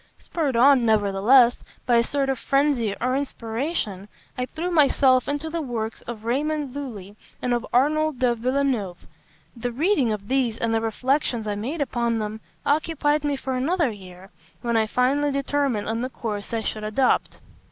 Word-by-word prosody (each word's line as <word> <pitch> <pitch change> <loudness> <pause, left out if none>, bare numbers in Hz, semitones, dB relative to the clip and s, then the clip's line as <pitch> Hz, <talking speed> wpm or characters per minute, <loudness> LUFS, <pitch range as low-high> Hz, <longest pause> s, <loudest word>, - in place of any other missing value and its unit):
Spurred 295 -7 -2
on, 260 +1 +6
nevertheless, 220 +3 +4 0.3
by 240 -1 +4
a 235 - +4
sort 275 +2 -1
of 265 -3 -1
frenzy 275 -7 +1
or 255 +2 0
inspiration, 230 - -3 0.3
I 250 0 -2
threw 340 +5 -4
myself 270 -5 +4
into 290 +2 -2
the 335 0 -2
works 230 -5 -4
of 225 -2 -7
Raymond 285 +2 -1
Lulli 210 -9 -7 0.2
and 245 - -1
of 240 +1 -2
Arnold 305 +3 +2
de 245 -1 +2
Villeneuve. 240 -6 -1 0.5
The 245 +1 -3
reading 285 - +1
of 205 -2 -4
these, 255 -3 0
and 230 -1 -1
the 225 - +1
reflections 240 +1 0
I 210 - -1
made 255 +10 -4
upon 235 -4 0
them, 215 0 -4 0.2
occupied 300 0 +1
me 290 -1 0
for 265 -1 -4
another 290 +2 +1
year, 190 -2 -12 0.3
when 235 -1 0
I 220 -1 +3
finally 275 +5 +1
determined 275 -5 -1
on 225 +1 -1
the 255 - -2
course 210 -5 -5
I 230 -1 -1
should 215 0 -4
adopt. 215 +5 +1
250 Hz, 170 wpm, -24 LUFS, 225-280 Hz, 0.5 s, on